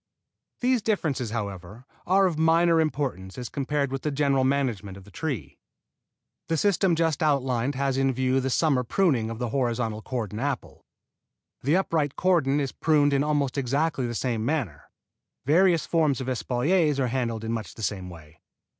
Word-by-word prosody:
These 250 -1 +2
differences, 155 - -1
however, 100 0 -6 0.2
are 190 +2 +4
of 170 -4 -1
minor 165 +1 +4
importance 135 - -3
as 125 -1 -5
compared 140 -1 -1
with 135 -1 -3
the 150 - -1
general 140 -2 +1
management 120 -8 -1
of 100 - -12
the 100 - -17
tree. 145 - -5 0.9
The 165 - 0
system 190 0 +2
just 160 -3 0
outlined 135 -3 +1
has 135 0 0
in 135 0 +2
view 130 +1 +1
the 135 0 -1
summer 135 -1 +2
pruning 125 - +1
of 115 - -5
the 120 0 -3
horizontal 115 -4 -1
cordon 110 -4 -4
apple. 135 -1 -4 0.7
The 145 +6 +2
upright 160 -7 0
cordon 155 -7 +2
is 135 -3 -2
pruned 145 -2 +2
in 140 0 +2
almost 145 -2 0
exactly 140 0 0
the 120 - -4
same 115 -2 -1
manner. 115 - -3 0.6
Various 170 +3 +4
forms 155 -5 +1
of 130 - -5
espaliers 145 +5 +1
are 130 -2 +1
handled 115 -3 -2
in 115 - -3
much 110 -2 -5
the 110 - -8
same 95 -3 -3
way. 80 -2 -14
135 Hz, 170 wpm, -26 LUFS, 120-155 Hz, 0.9 s, are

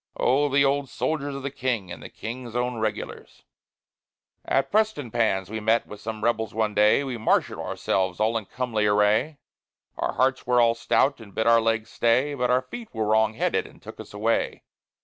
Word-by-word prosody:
Oh! 145 +3 +2
the 140 0 +3
old 140 0 0
soldiers 145 -3 -2
of 135 - -6
the 140 - -3
King, 120 -9 -2
and 90 - -8
the - - -9
King's 120 +1 -7
own 125 -1 -1
Regulars. 110 -1 -5 1.0
At 135 - 0
Prestonpans 120 - 0
we 110 - -3
met 110 +2 +2
with 105 - -11
some 110 -1 -6
rebels 110 -2 0
one 110 -1 0
day, 105 +6 +4
We 130 -4 -4
marshalled 110 - +1
ourselves 95 -1 -1
all 110 +2 +1
in 110 -2 -2
comely 110 -2 -1
array; 105 +9 +2 0.6
Our - - -1
hearts 130 -1 +1
were 125 0 +3
all 115 -1 +5
stout, 135 +4 +1
and 100 -3 -14
bid 110 - 0
our 115 0 +5
legs 115 -1 -1
stay, 125 +5 +2
But 125 -3 -1
our 125 +1 +3
feet 230 - -9
were 110 -1 0
wrong 110 +1 +2
headed - - 0
and - - -18
took - - -11
us - - -10
away. 110 +3 -1
115 Hz, 190 wpm, -25 LUFS, 110-130 Hz, 1.0 s, all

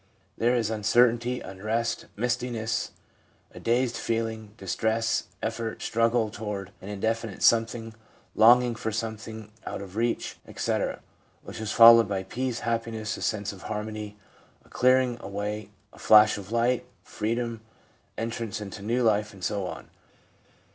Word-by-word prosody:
There 120 +2 +2
is 115 -2 0
uncertainty, 120 +3 +2
unrest, 110 +5 -2
mistiness, 120 -1 -1 0.6
a - - -10
dazed 120 +1 +1
feeling, 110 -2 -3
distress, 110 -1 0 0.2
effort, 115 0 -3
struggle 115 -1 +1
toward 100 -2 -5
an 95 - -8
indefinite 110 0 -2
something, 115 0 +3 0.4
longing 120 +2 +6
for 110 0 -3
something 110 -1 -5
out - - -5
of 100 -1 -9
reach, 115 +1 -1
etc., - - -2 0.4
which - - -8
is 110 -1 -3
followed 115 -2 +8
by 95 -1 -1
peace, 125 +4 -3
happiness, 115 -2 -2
a - - -9
sense 100 -1 -1
of 95 - -13
harmony, 105 -1 -5 0.5
a - - -22
clearing 130 -1 +3
away, 105 0 -4 0.2
a - - -16
flash 105 0 +7
of 100 0 -8
light, 120 +2 +2 0.2
freedom, 115 +1 -3 0.6
entrance 115 -1 -3
into 100 -1 -7
new 120 +5 0
life, 105 -1 +2
and 95 -2 -13
so 100 -2 -1
on. - - -8
110 Hz, 135 wpm, -27 LUFS, 105-115 Hz, 0.6 s, followed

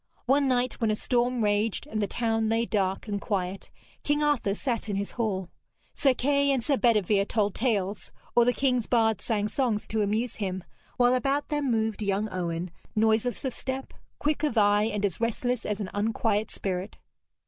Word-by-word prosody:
One 275 +2 +3
night, 250 -1 0
when 225 - +2
a 215 - +2
storm 245 +1 0
raged 205 +1 +1
and 215 0 -3
the 205 - +1
town 225 0 0
lay 225 +1 +2
dark 195 -2 -1
and 205 -1 -2
quiet, 190 -2 -3 0.3
King 295 0 +1
Arthur 275 -9 +1
sat 235 -2 -2
in 205 - -1
his 200 +1 -2
hall. 195 -6 -2 0.4
Sir 270 -3 +2
Kay 280 +2 +2
and 265 -4 +1
Sir 285 - +2
Bedevere 210 -5 +3
told 205 -3 +1
tales, 210 -5 -1 0.2
or 240 - +7
the 245 - +4
king's 250 -3 +1
bard 225 -3 +2
sang 210 -3 0
songs 230 -3 0
to 220 0 -1
amuse 215 +4 -1
him, 190 -3 -3 0.3
while 245 0 +4
about 275 +3 0
them 295 -2 0
moved 220 -2 0
young 200 +1 0
Owen, 175 -1 -3 0.2
noiseless 220 +4 +1
of 260 - -1
step, 265 +2 -4 0.2
quick 300 -1 0
of 295 -7 0
eye, 205 0 +4
and 210 -2 -1
as 195 +1 -2
restless 235 +1 -1
as 210 0 -2
an 200 -3 -4
unquiet 215 0 0
spirit. 190 0 -4
220 Hz, 185 wpm, -27 LUFS, 205-250 Hz, 0.4 s, or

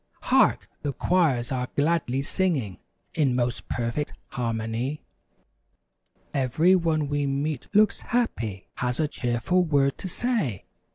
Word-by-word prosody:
Hark! - - +3
The 145 -2 -2
choirs 145 -11 +1
are 125 -1 -1
gladly 140 -3 +1
singing 145 - 0 0.3
In 140 -5 +2
most 120 -1 -1
perfect 120 +5 -2 0.2
harmony. 115 +4 -2 1.3
Every 150 +8 +3
one 160 -4 +1
we 145 0 0
meet 140 0 -2
looks 210 0 +4
happy; 115 - -1
Has 125 +2 -1
a 155 - +2
cheerful 125 +8 0
word 140 -4 +1
to 190 - -4
say. 185 - -1
140 Hz, 120 wpm, -26 LUFS, 120-165 Hz, 1.3 s, looks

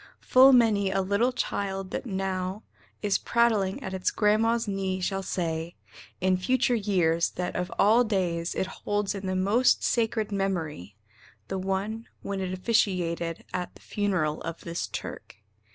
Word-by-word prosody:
Full 260 +1 +7
many 220 -6 +4
a 195 0 0
little 200 +6 +2
child 195 -5 -3
that - - -4
now 190 0 -3 0.4
Is 205 -1 +2
prattling 220 -5 +1
at 190 - -5
its 185 -1 0
grandma's 225 +2 +2
knee 190 -2 -2
shall 195 +1 -1
say 165 -3 -3 0.4
In 185 0 +2
future 255 +6 +1
years 180 -7 +2
that 180 - -3
of 180 +1 -2
all 225 +4 +5
days 180 -6 -1
it - - 0
holds 205 +1 -2
In 195 -1 -5
the 185 - -1
most 205 +7 +3
sacred 225 -2 0
memory 165 - -3 0.5
the 190 - -2
one 195 +4 -2 0.2
When 200 -1 -3
it 185 -1 -2
officiated 180 -5 0
at 180 -1 -4
The - - -17
funeral 185 -7 -1
of 165 0 -6
this 170 0 -4
Turk. - - -7
195 Hz, 150 wpm, -27 LUFS, 185-210 Hz, 0.5 s, Full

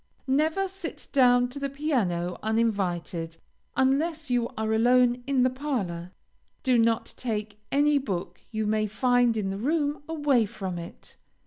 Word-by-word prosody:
Never 315 +8 +1
sit 380 -2 -8
down 245 -2 +5
to 275 +3 -7
the 280 0 -2
piano 215 - -1
uninvited, 185 -7 -1 0.4
unless 295 +3 +1
you 240 -1 +1
are 220 0 0
alone 245 +2 +4
in 270 -2 +3
the 255 - +4
parlor. 205 - -3 0.5
Do 255 -3 +3
not 230 0 +1
take 215 -3 -4
any 290 +1 +4
book 180 -7 -4
you 220 -1 -2
may 215 0 +1
find 245 +1 +2
in 195 -2 -1
the 195 - -4
room 290 +3 0
away 290 -8 +2
from 190 -3 -5
it. 170 - -11
245 Hz, 145 wpm, -27 LUFS, 210-280 Hz, 0.5 s, down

